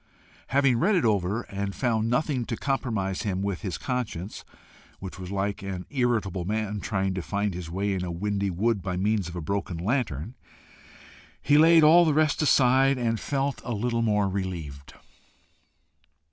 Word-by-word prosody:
Having 135 -3 +3
read 200 - +3
it 175 - +2
over, 105 +1 +1
and 100 0 -5
found 115 -3 0
nothing 130 0 0
to 115 - -4
compromise 110 -9 -2
him 95 -2 -2
with 100 -3 -2
his 95 -5 -3
conscience, 110 -7 -4 0.5
which 95 0 -8
was 90 -1 -7
like 100 +1 -2
an 95 -2 -5
irritable 115 -9 0
man 105 +2 -2
trying 95 -2 -1
to 95 - -3
find 100 +2 -2
his 85 -2 -6
way 100 +3 -1
in 95 -1 -2
a 90 - -4
windy 100 +3 -1
wood 100 +4 0
by 90 0 -3
means 100 -1 0
of 85 - -9
a 85 - -4
broken 95 +1 -3
lantern, 100 - -2 1.1
he 145 - +2
laid 160 +1 +7
all 165 +3 +7
the 155 -3 +2
rest 155 0 +2
aside 135 -2 +4
and 115 -2 0
felt 140 -1 -2
a 120 - -3
little 115 +2 -1 0.2
relieved. 90 -8 -4
105 Hz, 165 wpm, -26 LUFS, 95-125 Hz, 1.1 s, laid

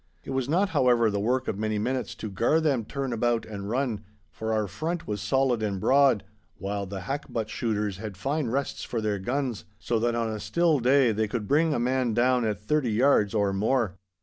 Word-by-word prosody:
It - - -7
was 130 -1 -1
not, 190 +6 +2
however, 120 - +3
the 100 - -1
work 125 +5 0
of 100 - -2
many 110 0 -1
minutes 125 +1 -2
to 110 - -6
gar 115 - +2
them 140 -8 +1
turn 135 +1 -3
about 115 0 0
and 100 -2 -6
run, 120 -3 -1 0.3
for 110 0 -4
our 110 -1 +1
front 160 - -3
was 105 -2 -3
solid 130 -4 +1
and 100 -3 -1
broad, 135 -3 +4 0.3
while 100 0 -3
the 95 0 -6
hackbutt 115 -2 -3
shooters 105 -4 -2
had 105 -2 -7
fine 140 - -1
rests 135 +4 -2
for 120 - -3
their 105 -2 -1
guns, 125 +2 -2
so 115 +1 -1
that 120 +1 +1
on 115 -1 -1
a 110 - -4
still 170 +3 +2
day 130 0 +4
they 110 0 0
could 105 -1 -3
bring 155 +3 +3
a 145 - 0
man 125 -2 0
down 125 0 +3
at 105 -3 -1
thirty 125 +3 0
yards 110 -4 +3
or 100 -2 +2
more. 110 0 +1
115 Hz, 210 wpm, -27 LUFS, 105-135 Hz, 0.3 s, broad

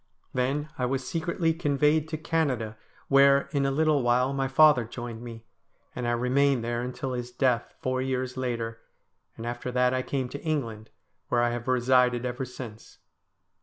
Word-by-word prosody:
Then 135 +4 -1
I 125 - +1
was 130 0 -2
secretly 165 0 0
conveyed 150 -1 +2
to 160 -1 -4
Canada, 140 -9 -1 0.3
where, 140 0 +6
in 140 -2 +1
a - - +1
little 155 0 +2
while, 125 +2 +2
my 135 -1 0
father 145 -2 +6
joined 115 0 -7
me, 115 -2 -9 0.5
and 125 -1 -3
I - - +2
remained 125 +1 +2
there 120 0 -2
until 125 +1 -4
his 125 -1 -4
death, 125 -1 0
four 130 0 -1
years 130 -1 -2
later, 115 -3 -3 0.6
and 115 - -6
after 120 +1 -4
that 125 0 +3
I 130 - +1
came 130 -1 -2
to 140 - -7
England, 115 -9 -3 0.4
where 120 - +2
I 120 - +2
have 120 +1 -5
resided 125 -1 +3
ever 125 +1 -3
since. 120 -3 -10
130 Hz, 170 wpm, -27 LUFS, 120-140 Hz, 0.6 s, where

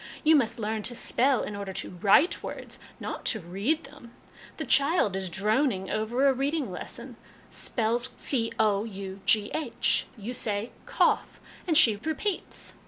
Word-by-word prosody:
You 315 0 +6
must 235 -4 +2
learn 220 -1 -2
to 240 +3 -3
spell 255 +1 +2
in 210 - -5
order 200 -1 -5
to - - -3
write 240 - +4
words, - - -6 0.2
not - - -5
to 220 - +1
read 200 - -1
them. 245 -4 -14 0.4
A 315 - -4
child 275 - +3
is 190 -1 -3
droning 210 - 0
over 235 +6 +1
a 270 - +5
reading 280 +2 -1
lesson, - - -8 0.3
spells 235 +1 +1
cough; 225 -5 0
you 205 +4 -1
say 215 -1 -1
' - - -27
cough,' - - +1 0.3
and 320 -3 +3
she 225 -7 +6
repeats. 320 - -3
230 Hz, 145 wpm, -27 LUFS, 205-275 Hz, 0.4 s, You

